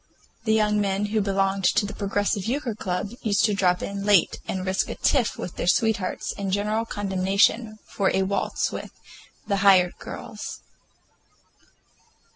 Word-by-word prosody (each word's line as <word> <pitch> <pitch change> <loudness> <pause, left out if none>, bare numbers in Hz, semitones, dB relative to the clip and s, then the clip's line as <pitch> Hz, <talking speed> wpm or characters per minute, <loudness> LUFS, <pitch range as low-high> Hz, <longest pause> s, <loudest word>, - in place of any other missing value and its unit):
The 220 - +3
young 210 -1 +2
men 200 0 0
who 215 - +3
belonged 195 -1 0
to - - +3
the 205 - -6
Progressive 200 -1 -1
Euchre 255 0 -1
Club 195 0 -3
used 210 -2 +2
to 215 - +1
drop 180 -2 +1
in 200 0 -4
late 200 -4 +3
and 190 -1 -3
risk 190 0 0
a - - -4
tiff 250 -6 +1
with 180 - -6
their - - -2
sweethearts 210 -1 +1
and 195 -1 -2
general 210 +3 0
condemnation 205 +2 +1
for 195 -2 0
a 190 - +1
waltz 200 +1 -1
with - - -6 0.6
"the 200 - 0
hired 190 -3 +5
girls." - - -8
200 Hz, 155 wpm, -25 LUFS, 190-210 Hz, 0.6 s, hired